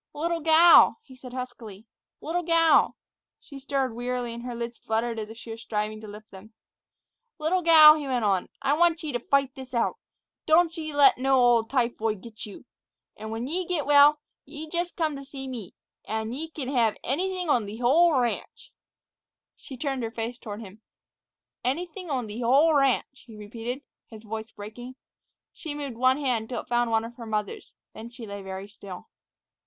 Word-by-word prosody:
"Little 335 +3 -1
gal!" 325 +2 +7
he 260 - -15
said 250 0 -11
huskily; 245 -5 -8 0.4
"little 340 +3 -2
gal!" 330 -1 +4 0.4
She 280 -2 -12
stirred 270 -2 -1
wearily, 245 0 -3
and 235 - -7
her 245 0 -6
lids 235 0 -6
fluttered 225 +1 -2
as 215 -1 -6
if 225 - -11
she 230 - -9
were 225 - -6
striving 215 -1 -4
to 215 - -9
lift 210 +1 -12
them. 195 +4 -13 0.8
"Little 330 +4 0
gal," 315 -2 +9
he 300 -2 -4
went 250 -4 0
on; 195 -3 +1
"I 275 +1 +2
want 335 +1 +2
ye 305 - -3
t' 245 - -2
fight 275 +2 +1
this 260 -2 -9
out. 235 - 0 0.5
Don't 330 +1 +4
ye 310 -2 -5
let 285 -3 +5
no 270 +1 +3
ol' 240 -2 +4
typhoid 225 -5 -1
git 220 -1 -9
you. 205 - -12 0.5
An' 220 - -8
when 225 +2 -4
ye 345 +7 -2
git 340 -5 -1
well, 290 +1 +6 0.2
ye 300 +2 -9
jus' 345 +2 -2
come 315 -4 -2
to 275 - -8
see 270 -1 -8
me, 235 -8 -7 0.3
an' 220 +1 -3
ye 315 +5 -5
kin 285 -5 -6
hev 235 -5 +1
anything 365 +6 -2
on 240 -8 +2
th' 215 +3 -8
whole 295 +4 +4
ranch." 240 -2 -3 0.8
She 265 - -11
turned 270 -1 -2
her 225 - -2
face 230 +2 -5
toward 210 -1 -7
him. 210 0 -12 0.8
"Anything 345 +7 -3
on 255 -5 -2
th' 215 +3 -6
whole 280 +7 +4
ranch," 270 -1 +1
he 225 - -12
repeated, 230 +6 -6 0.2
his 220 -1 -12
voice 220 0 -6
breaking. 225 +5 -10 0.6
She 310 -3 -7
moved 280 -4 -5
one 255 +3 +3
hand 245 -6 -1
till 245 - -3
it - - -28
found 240 0 +1
one 225 0 +1
of 235 +1 -11
her 230 -2 -8
mother's, 210 -2 -4 0.2
then 225 +2 -9
she 240 -1 -10
lay 200 -1 -7
very 190 0 -7
still. 200 -3 -11
250 Hz, 190 wpm, -26 LUFS, 225-295 Hz, 0.8 s, gal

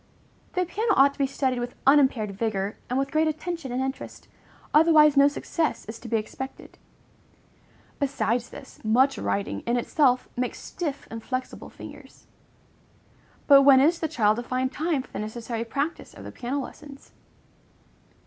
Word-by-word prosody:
The 365 -1 0
piano 420 +4 0
ought 275 +1 +6
to - - -23
be 275 - +2
studied 265 -2 -1
with 245 0 -5
unimpaired 265 -7 +4
vigor, 200 -1 -2
and 250 - -1
with 275 0 -1
great 315 +1 +2
attention 310 -2 -4
and 255 +2 -1
interest, 265 +1 -6 0.5
otherwise 305 -1 +6
no 280 0 +7
success 310 +2 -2
is 220 +2 -8
to 240 - -10
be 230 - +1
expected. 265 +5 -8 1.2
Besides 245 -4 -1
this, - - -12
much 255 +5 +3
writing, 200 0 -2
in 240 +1 +2
itself, 255 +1 +2
makes 250 0 -2
stiff, 295 -5 -5
inflexible 255 +3 -5
fingers. - - -13 1.2
But 280 -1 +8
when 275 -1 +7
is 325 +5 +3
the 320 - -1
child 215 -8 +2
to - - -2
find 255 +1 -1
time 305 -3 -1
for - - -20
the - - -5
necessary 225 +2 -4
practice 280 +8 -4
of - - -11
the - - -8
piano 255 +3 -3
lessons? 275 +1 -10
265 Hz, 160 wpm, -25 LUFS, 240-295 Hz, 1.2 s, But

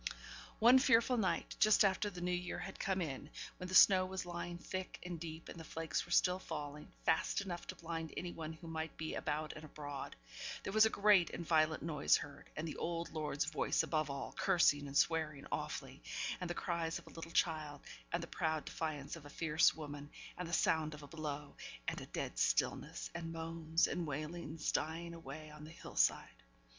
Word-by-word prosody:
One 245 +4 +8
fearful 250 -1 +5
night, 195 -5 0
just 215 0 +6
after 195 +2 +2
the 180 -3 -8
New 180 +1 0
Year 180 0 -2
had 195 - -6
come 190 -2 +1
in, 145 -1 -5 0.3
when 180 - -5
the 185 - -1
snow 185 -1 +9
was 185 0 -4
lying 175 0 -4
thick 185 +2 -5
and 175 -2 -4
deep; 160 0 -7
and 170 - -8
the - - -7
flakes 160 +1 -2
were - - -11
still 180 +1 +4
falling 150 -4 -6
fast 160 - +3
enough 175 -3 -5
to - - -5
blind 165 -1 -4
any 175 - -3
one 160 -1 -5
who 165 +1 -11
might 160 -1 -4
be 160 0 -3
out 155 0 -2
and 155 - -9
abroad 145 -2 -6 0.5
there 195 - -3
was 215 +1 +7
a - - 0
great 200 -5 +5
and 170 - -5
violent 155 -1 +3
noise 150 -3 +4
heard, 145 - -9
and 155 +2 -2
the 155 - -5
old 170 0 -2
lord's 150 -2 -1
voice 155 0 +1
above 155 -1 0
all, 140 0 -4
cursing 155 -7 +4
and 140 0 -1
swearing 155 -4 +2
awfully, - - -4 0.4
and 180 - -3
the 175 - -2
cries 170 -2 -1
of - - -11
a - - -13
little 165 0 -7
child, 155 -4 +1 0.3
and 170 0 0
the - - -3
proud 160 -3 -1
defiance 155 -3 -3
of 150 -3 -10
a - - -11
fierce 160 +1 +3
woman, 145 -2 -7 0.3
and 180 -2 -5
the - - -6
sound 160 -2 +2
of 150 - -11
a - - -9
blow, 150 -2 -5 0.3
and - - -1
a - - -8
dead - - -4
stillness, - - +1
and 165 -1 -4
moans 165 0 +1
and 175 -2 -2
wailings 155 +2 -3
dying 165 +2 -1
away 155 -2 -8
on 150 0 -11
the 155 - -8
hill 165 - -10
side! - - +2
165 Hz, 205 wpm, -37 LUFS, 155-175 Hz, 0.5 s, snow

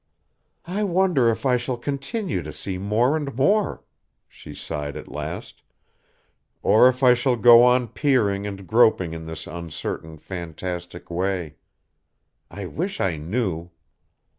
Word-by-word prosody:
"I 190 +5 -2
wonder 180 - +3
if 115 - -2
I 125 -2 +4
shall 125 +1 -3
continue 140 - -3
to 75 - -7
see 90 +5 -5
more 110 +8 +2
and 145 -5 -3
more?" 200 - +1 0.4
she - - -12
sighed 75 -1 -5
at - - -10
last, - - -6 1.0
"or 125 +4 +6
if 130 +1 -4
I 125 -1 +8
shall 125 +1 +1
go 120 +1 +8
on 125 0 +4
peering 105 -8 +1
and 95 -1 -7
groping 110 -6 +3
in 80 0 -7
this 80 0 -7
uncertain, 80 -1 -6
fantastic 85 +1 -7
way. 90 -4 -2 0.9
I 100 +2 -7
wish 185 - -4
I 85 -5 0
knew." 85 0 -2
110 Hz, 140 wpm, -23 LUFS, 85-130 Hz, 1.0 s, I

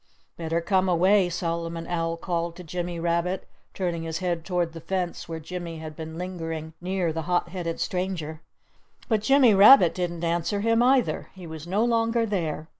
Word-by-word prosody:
"Better 165 0 -2
come 185 +1 +2
away!" 185 +2 +4
Solomon 165 -1 -3
Owl 165 -1 -2
called 170 -1 -2
to 180 - -9
Jimmy 175 +1 -4
Rabbit, 170 +2 -1 0.3
turning 175 -3 -2
his 165 0 -3
head 175 -3 -2
toward 175 -2 -1
the 165 - -8
fence 180 -2 -3
where 165 -1 -4
Jimmy 170 0 -6
had 155 -1 -8
been 160 0 -7
lingering 165 -3 -5
near 180 -2 -1
the 160 - -2
hot 175 -1 +1
headed 170 -2 -4
stranger. 180 -4 -3 0.7
But 220 -3 +1
Jimmy 255 0 +5
Rabbit 200 -2 +8
didn't 175 -2 -3
answer 170 +4 0
him, 230 +2 +3
either. 255 0 +2
He 185 -2 -10
was 160 0 -8
no 205 +6 +1
longer 230 0 +2
there. 165 -7 -2
175 Hz, 175 wpm, -26 LUFS, 165-190 Hz, 0.7 s, Rabbit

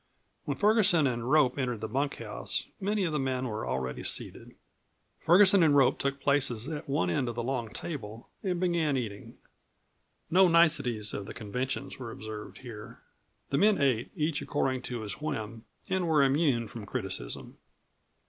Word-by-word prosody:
When - - -2
Ferguson 205 -7 +4
and 120 -2 -1
Rope 145 -3 +3
entered 125 -4 -1
the 110 - -3
bunkhouse 115 -4 -2
many 205 +1 0
of 165 -4 -1
the 150 - 0
men 130 -1 -1
were 110 -1 -4
already 65 -1 -3
seated. - - -3 0.6
Ferguson 190 +3 +6
and 155 -3 +5
Rope 135 -3 +4
took 140 0 -1
places 135 -5 +1
at 150 -3 -6
one 90 -10 +1
end 125 +7 0
of 120 - -5
the 120 - -3
long 120 -3 -2
table 115 -6 -7
and 180 -3 -1
began 170 -6 +1
eating. 105 -5 -6 0.9
No 185 +2 +6
niceties 150 -11 +3
of 100 - -5
the - - -8
conventions 125 +6 -4
were 125 -3 -6
observed 110 -1 -8
here; 115 -5 -10 0.5
the 140 - +2
men 210 +2 +4
ate 130 -5 +1
each 155 -3 -1
according 130 -3 -1
to 120 -2 -4
his 105 +5 -6
whim 115 -7 -4 0.2
and 185 -2 0
were 155 -3 +4
immune 135 -4 +2
from 105 -1 -9
criticism. - - -3
135 Hz, 165 wpm, -29 LUFS, 115-160 Hz, 0.9 s, Ferguson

